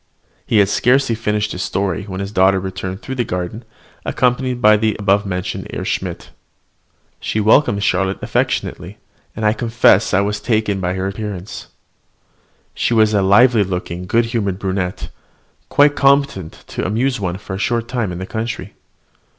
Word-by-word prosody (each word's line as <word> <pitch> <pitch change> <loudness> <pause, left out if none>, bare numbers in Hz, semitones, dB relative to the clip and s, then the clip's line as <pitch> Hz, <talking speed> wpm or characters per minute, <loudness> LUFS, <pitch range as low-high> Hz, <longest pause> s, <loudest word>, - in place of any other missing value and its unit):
He 110 - +2
had 100 -1 +5
scarcely 125 +4 +2
finished 105 -1 -1
his 90 - -4
story 95 -1 -2
when 95 -2 -5
his 100 +1 -5
daughter 95 -1 +3
returned 95 +1 -5
through 130 - -5
the 125 -2 0
garden, 90 +3 -4 0.4
accompanied 125 0 0
by 105 -2 +6
the 110 0 +1
above 100 0 +1
mentioned 90 -1 -4
Herr - - -4
Schmidt. - - -4 0.9
She 110 - -2
welcomed 105 -1 +3
Charlotte 95 0 +1
affectionately, - - -2 0.4
and 110 - -3
I 105 - +4
confess 115 -3 +3
I 95 - +3
was 105 +1 -1
much - - -17
taken 110 -4 +1
with 90 0 -1
her 95 0 -2
appearance. 100 -1 -6 1.1
She 120 - 0
was 110 -1 +4
a 100 - +3
lively 105 +4 +5
looking, 90 -1 -4
good 115 +4 +2
humoured 105 -5 -2
brunette, 95 -2 -3 0.6
quite 145 0 +4
competent 140 - +1
to - - -4
amuse 115 +7 0
one 90 -2 -2
for 100 -1 -8
a 95 - -4
short 115 +2 -1
time 120 -6 -2
in 90 - -5
the 95 - -5
country. 110 +2 -5
105 Hz, 165 wpm, -18 LUFS, 95-115 Hz, 1.1 s, by